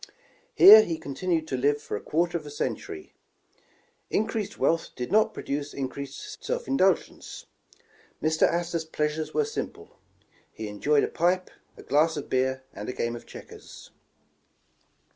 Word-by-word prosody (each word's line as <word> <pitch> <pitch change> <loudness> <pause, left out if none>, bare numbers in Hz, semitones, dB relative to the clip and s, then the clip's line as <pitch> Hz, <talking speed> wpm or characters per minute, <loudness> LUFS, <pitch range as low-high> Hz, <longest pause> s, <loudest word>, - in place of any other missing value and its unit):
Here 215 +2 +11
he 170 -6 -2
continued 160 +3 -2
to - - -1
live 145 +3 +2
for 145 - -5
a 105 - -5
quarter 170 +2 0
of 155 -3 -3
a - - -6
century. 380 - -5 1.0
Increased 220 -1 -2
wealth 165 0 +1
did 125 +3 -5
not 215 +1 +4
produce 145 +1 -4
increased 140 - -6
self - - -3
indulgence. 195 - 0 0.7
Mr. 155 0 +3
Astor 170 0 -1
's 160 - -6
pleasures 155 0 -2
were 450 - +2
simple. 450 - -7 0.5
He 110 - -7
enjoyed 140 +8 +2
a - - +1
pipe, 180 +2 0 0.3
a - - -12
glass 155 +3 +2
of 145 - -7
beer, 130 0 0
and 105 +3 -7
a - - -3
game 115 -1 -2
of 120 - -11
checkers. - - -12
155 Hz, 150 wpm, -26 LUFS, 140-185 Hz, 1.0 s, Here